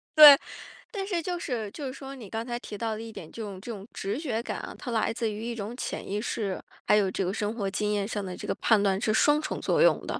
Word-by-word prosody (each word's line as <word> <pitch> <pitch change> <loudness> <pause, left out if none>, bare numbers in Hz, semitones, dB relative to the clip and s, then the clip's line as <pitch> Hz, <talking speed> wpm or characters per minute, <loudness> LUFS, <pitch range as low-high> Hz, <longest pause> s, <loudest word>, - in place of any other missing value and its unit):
对， 295 -2 +12 0.5
但 390 -4 -3
是 355 -4 0
就 355 +1 -3
是 225 -9 -3
就 285 +2 -5
是 255 - -5
说 270 0 -8
你 235 -8 -10
刚 225 +1 -3
才 240 -1 -3
提 210 - -7
到 225 0 -1
的 215 - -5
一 225 0 -7
点， 160 -6 -9
这 230 - -7
种 200 -3 -6
这 235 - -6
种 205 -1 -8
直 200 +6 -3
觉 235 -7 -2
感 - - -4
啊， - - -7
它 245 - -6
来 225 0 +1
自 225 -2 -1
于 210 +2 -6
一 235 0 -3
种 220 +2 -5
潜 - - -4
意 205 +2 -2
识， 205 -4 -2 0.3
还 210 - +6
有 195 -2 +3
这 190 - -1
个 185 - -1
生 210 +1 -2
活 200 -4 -1
经 210 +1 0
验 200 -1 0
上 205 -2 -3
的 180 -1 -5
这 - - -8
个 - - +1
判 220 -3 +3
断 195 -1 +2
是 215 - +1
双 295 +6 +4
重 - - -4
作 - - +2
用 - - +4
的。 - - -3
225 Hz, 310 characters per minute, -28 LUFS, 205-255 Hz, 0.5 s, 对